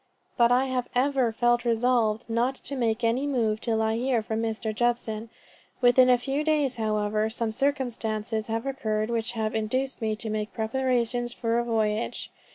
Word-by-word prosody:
But 235 -1 +4
I 255 +2 +4
have 255 -2 -2
ever 260 -2 +2
felt 240 +1 +2
resolved 235 -1 +1
not 240 +3 0
to 280 - -4
make 230 -4 0
any 240 +5 +1
movement 225 -6 0
till 220 -2 0
I 220 0 +1
hear 245 -2 +1
from 220 +1 -2
Mr. 220 -1 -2
Judson. 230 -1 -1 0.5
Within 250 0 +5
a 250 - +6
few 270 +4 -2
days, 295 -5 +1
however, 215 0 0
some 225 0 -2
circumstances 225 -5 -1
have 225 +2 -2
occurred 220 -5 -1
which 230 0 -1
have 220 -2 -2
induced 255 +5 -1
me 220 -1 0
to 220 +1 -6
make 215 0 -3
preparations 240 +1 0
for 230 -1 0
a - - 0
voyage. 220 -1 -1
235 Hz, 170 wpm, -26 LUFS, 220-250 Hz, 0.5 s, a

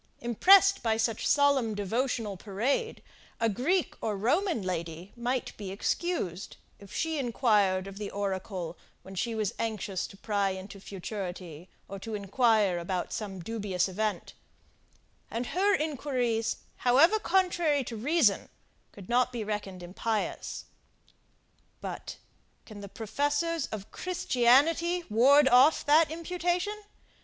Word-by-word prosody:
Impressed 390 - +5
by 220 -1 +1
such 225 -1 0
solemn 280 -6 +3
devotional 220 +1 -1
parade, 230 - -2 0.4
a 230 - +2
Greek 280 - 0
or 210 -2 -2
Roman 300 - +1
lady 170 0 -5
might 245 +1 -2
be 200 -3 -6
excused, 200 - -2 0.2
if 200 -1 -14
she 320 -1 -1
inquired 210 -7 +2
of 195 +1 -9
the 210 - -4
oracle, 190 -3 -4 0.2
when 190 - -11
she 230 +4 -2
was 215 -3 -1
anxious 210 -4 -2
to 195 - -14
pry 200 -1 0
into 190 +1 -7
futurity, 185 -4 -7 0.2
or 195 0 -7
inquire 210 -2 +1
about 175 +1 -3
some 195 -4 -5
dubious 205 -2 -1
event: 210 +3 -3 1.0
and 235 +2 -3
her 395 +2 +3
inquiries, 255 -7 -1 0.2
however 300 - +4
contrary 350 -8 +1
to 235 - -7
reason, 250 - +2 0.4
could 195 -3 -12
not 250 +1 +2
be 235 -3 -4
reckoned 205 -3 -5
impious. 210 +5 -3 1.1
But, - - -7 0.5
can 210 -2 -10
the 200 - -8
professors 290 - -1
of 205 -2 -7
Christianity 330 +2 +2
ward 270 +6 +6
off 265 +5 +5
that 310 +2 +5
imputation? 355 +4 -2
225 Hz, 125 wpm, -29 LUFS, 195-290 Hz, 1.1 s, ward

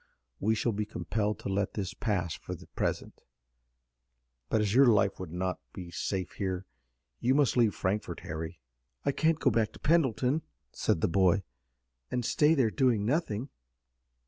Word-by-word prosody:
We 110 +3 +2
shall 115 +2 +1
be 105 0 -2
compelled 105 -1 -1
to - - -5
let 100 0 -1
this 100 0 -3
pass 95 -8 -1
for - - -6
the - - -13
present, - - -3 1.3
but - - +2
as 105 -1 +1
your 135 +2 +7
life 105 -4 +3
would 90 -4 -6
not 90 +1 -2
be 90 -2 -8
safe 90 +1 -2
here 95 -1 -3 0.5
you 130 +2 +2
must 145 -3 +3
leave 115 -4 +3
Frankfort, 100 +3 -2
Harry." 80 +2 -5 0.5
"I 140 - +3
can't 160 +2 +2
go 130 - +3
back 110 -1 +1
to - - -13
Pendleton," 145 -2 +2 0.3
said 80 - 0
the - - +3
boy, 95 +2 +3 0.7
"and 125 -2 -1
stay 150 +6 +4
there, 125 -7 +3
doing 120 -6 +2
nothing." 130 -2 -1
105 Hz, 165 wpm, -30 LUFS, 95-125 Hz, 1.3 s, your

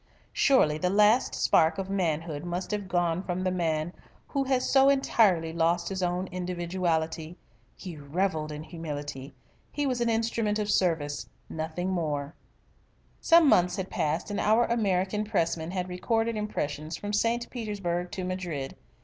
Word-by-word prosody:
"Surely 155 - +4
the 180 - +1
last 210 +5 +4
spark 160 0 +3
of 195 -1 -3
manhood 165 -5 -1
must 175 +2 -4
have 205 -2 -2
gone 175 -1 +1
from 185 -1 -3
the 185 - +1
man 165 -2 -1 0.4
who 275 -1 0
has 260 -1 +1
so 270 0 +5
entirely 200 -12 +3
lost 170 +1 +1
his 190 -1 -3
own 180 +1 -1
individuality. 175 -2 -2 0.4
He 175 -4 -8
revelled 155 +1 -1
in 150 +1 -6
humility. 145 -5 -6 0.4
He 290 0 -1
was 250 -3 -1
an 235 - +2
instrument 225 -2 0
of 210 -1 -1
service 160 -7 0 0.2
nothing 160 +4 -3
more." 150 -4 -2 0.9
Some 335 -2 +6
months 180 -8 +4
had 190 -1 -4
passed 160 +7 -1
and 205 - -2
our 220 +3 +4
American 205 -3 0
Pressman 170 -6 -1
had 180 0 -2
recorded 225 +5 0
impressions 155 -7 -3
from 205 0 -5
St. 230 +3 +1
Petersburg 195 -7 -3
to 185 - -3
Madrid. 180 -7 -4
180 Hz, 150 wpm, -28 LUFS, 160-210 Hz, 0.9 s, Some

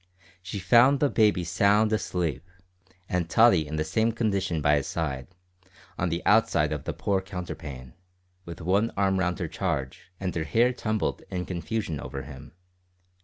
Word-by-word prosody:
She 95 +3 -6
found 120 +9 +5
the 145 -1 +2
baby 105 -5 +3
sound 100 +5 +3
asleep, 85 - -2 0.6
and 90 -2 -1
Tottie 95 -9 +5
in 75 - -5
the 75 - 0
same 110 +9 +1
condition 100 -7 -1
by 75 0 +3
his 70 - -2
side, 70 -6 -3 0.7
on 90 - -1
the 85 +1 -3
outside 85 -8 +3
of 75 - -5
the - - -1
poor 100 -2 0
counterpane, 80 -9 -7 0.5
with 85 -2 -9
one 100 +7 +2
arm 95 -1 +2
round 90 -1 0
her 85 -4 -3
charge, 65 +3 -4
and 95 -2 -3
her 80 - -2
hair 115 - +2
tumbled 110 -3 -2
in 90 -2 -3
confusion 95 -2 -3
over 70 0 -6
him. 70 -1 -11
90 Hz, 165 wpm, -26 LUFS, 80-105 Hz, 0.7 s, found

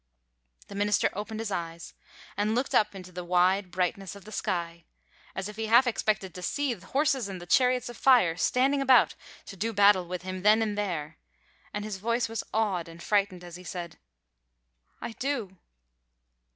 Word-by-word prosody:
The - - -10
minister 205 0 +1
opened 215 +2 -5
his 220 -2 -4
eyes 170 -2 -5 0.4
and 210 +2 0
looked 250 +3 -1
up 210 -1 +3
into 185 -1 -9
the 180 0 -6
wide 180 +2 +2
brightness 185 +1 -2
of 200 - -13
the 215 - -11
sky, 170 -4 -3 0.5
as 190 +1 -3
if 210 0 -9
he 225 0 -2
half 240 +4 +6
expected 205 -5 -1
to 180 - -8
see 280 +8 -1
horses 265 - 0
and 180 -2 -7
chariots 250 +4 +3
of 240 - -8
fire 240 -11 +5
standing 265 +9 +2
about 260 -2 +5 0.3
to 195 - -9
do 225 +4 -2
battle 200 -3 +5
with 180 0 -5
him 185 0 -5
then 215 +3 +5
and 210 -2 -2
there, 175 - -3 0.5
and 205 0 -4
his 210 -3 -4
voice 230 +4 0
was 225 -1 -4
awed 195 -6 0
and 165 +1 -11
frightened 195 -3 +1
as 175 0 -9
he 180 - -12
said: 175 -2 -7 1.0
"I - - -4
do!" 230 -7 -3
200 Hz, 180 wpm, -28 LUFS, 180-225 Hz, 1.0 s, half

